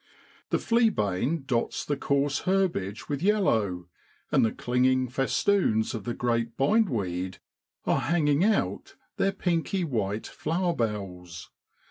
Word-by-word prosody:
The - - +2
flea 230 0 +3
bane 130 - -1
dots 120 -3 -1
the 145 - 0
coarse 140 +1 0
herbage 180 - 0
with 145 -1 -3
yellow, 110 - +1 0.4
and - - +4
the 110 - +2
clinging 130 +1 +1
festoons 135 - +1
of 110 -4 -5
the 120 - -3
great 115 -1 -1
bindweed 110 - +1 0.5
are - - +2
hanging 145 +2 +2
out 215 +1 0 0.2
their 195 - +2
pinky 180 0 -1
white 110 - -2
flower 175 +2 -1
bells. 90 - -4
130 Hz, 125 wpm, -27 LUFS, 105-175 Hz, 0.5 s, and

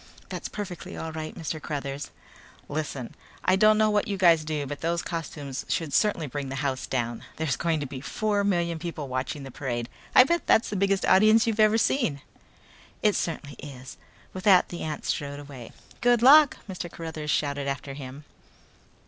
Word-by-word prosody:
"That's - - -5
perfectly 195 -4 -6
all 160 - -5
right, 155 0 -6
Mr. 160 -1 -4
Cruthers." 140 -1 -4 0.6
"Listen, 145 -4 -4 0.3
I 185 - +5
don't 215 +2 +5
know 215 0 +3
what 210 -1 +1
you 200 - -2
guys 170 -4 +5
do 155 -2 -2
but 145 +1 -6
those 170 +1 0
costumes 150 -5 -5
should 160 -4 -1
certainly 185 -1 +2
bring 140 0 -5
the 135 - -4
house 130 -2 -2
down. 120 -2 -2
There's 160 -4 -1
going 165 -2 0
to - - -2
be 130 -1 -7
four 205 +5 0
million 170 -4 0
people 160 -3 -5
watching 130 +2 -3
this 135 -2 -9
parade. 120 -3 -3 0.3
I - - +10
bet 340 +6 0
that's 220 - +4
the - - -2
biggest 195 0 +1
audience 215 +4 +6
you've 225 -1 -1
ever 215 +1 +5
seen." 225 - +1 0.8
"It 210 - +4
certainly 155 -3 -3
is." 130 -3 -9 0.4
With 185 - -6
that 190 -3 +6
the 175 - -6
ant 155 -1 -4
strode 145 0 -2
away. 140 -5 -10 0.3
"Good 240 -1 +3
luck!" 290 +2 +8
Mr. 180 -3 -6
Cruthers 160 -2 -6
shouted 145 -1 0
after 140 0 -4
him. 135 +1 -9
160 Hz, 180 wpm, -26 LUFS, 140-200 Hz, 0.8 s, I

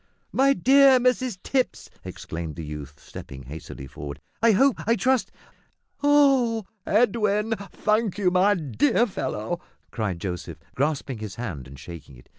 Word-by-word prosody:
"My 275 +1 +4
dear 270 -1 +6
Mrs 250 -3 +1
Tipps," 260 -2 -1 0.2
exclaimed 80 -2 -6
the 80 - -6
youth, 75 -1 -8
stepping 65 -1 -10
hastily 70 0 -9
forward, 70 +2 -8 0.2
"I 230 -1 +5
hope 270 +5 +4
I 230 - +4
trust 260 +1 +1 0.4
" - - -45 0.3
"Oh, 270 -7 +4 0.2
Edwin 210 -1 +2 0.2
thank 215 -2 0
you, 190 -3 +2
my 190 +3 +4
dear 145 - +2
fellow," 175 - -4 0.3
cried 105 -7 -2
Joseph, 90 -1 -5 0.2
grasping 140 -3 -1
his 105 -3 -6
hand 85 - -6
and 70 +1 -12
shaking 75 -2 -10
it. - - -18
185 Hz, 145 wpm, -25 LUFS, -, 0.4 s, dear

